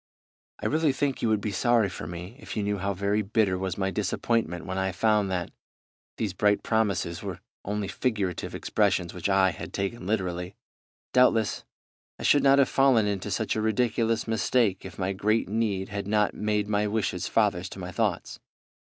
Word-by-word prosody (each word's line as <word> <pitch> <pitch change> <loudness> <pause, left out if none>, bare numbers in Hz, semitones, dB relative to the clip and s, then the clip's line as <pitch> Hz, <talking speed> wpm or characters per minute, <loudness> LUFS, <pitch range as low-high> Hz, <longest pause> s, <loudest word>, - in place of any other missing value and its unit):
"I - - -3
really 155 -2 +2
think 140 0 -1
you 115 - +1
would 110 -2 +2
be 105 - -2
sorry 115 +2 +3
for 85 -4 -7
me 90 +6 -7
if - - -7
you 105 - 0
knew 100 0 -1
how 100 +1 -1
very 100 +3 +1
bitter 105 -2 +1
was 95 -1 -3
my 95 -1 0
disappointment 100 -3 -1
when 95 +1 -3
I 95 0 0
found 105 0 +2
that, 90 -2 -2 0.7
these 105 -5 -2
bright 105 +1 +2
promises 100 -6 0
were - - -5 0.2
only 105 0 -2
figurative 105 -8 -2
expressions 95 -5 0
which 90 +2 -3
I 95 -1 +4
had - - -8
taken 100 0 -3
literally. 90 -3 -2 0.6
Doubtless 115 -4 +3 0.5
I - - -8
should 145 - +5
not 135 0 +5
have 140 - +5
fallen 135 -5 +4
into 100 -3 -2
such - - -1
a 110 - 0
ridiculous 115 +1 +1
mistake 110 -3 +1
if 90 -4 -9
my 95 +1 -1
great 105 +4 +1
need 100 -2 -1
had 100 -1 -4
not 105 0 +2
made 105 -1 -1
my 105 0 +1
wishes 110 +1 -1
fathers - - +1
to - - -10
my - - -6
thoughts. - - -2
105 Hz, 185 wpm, -27 LUFS, 95-110 Hz, 0.7 s, should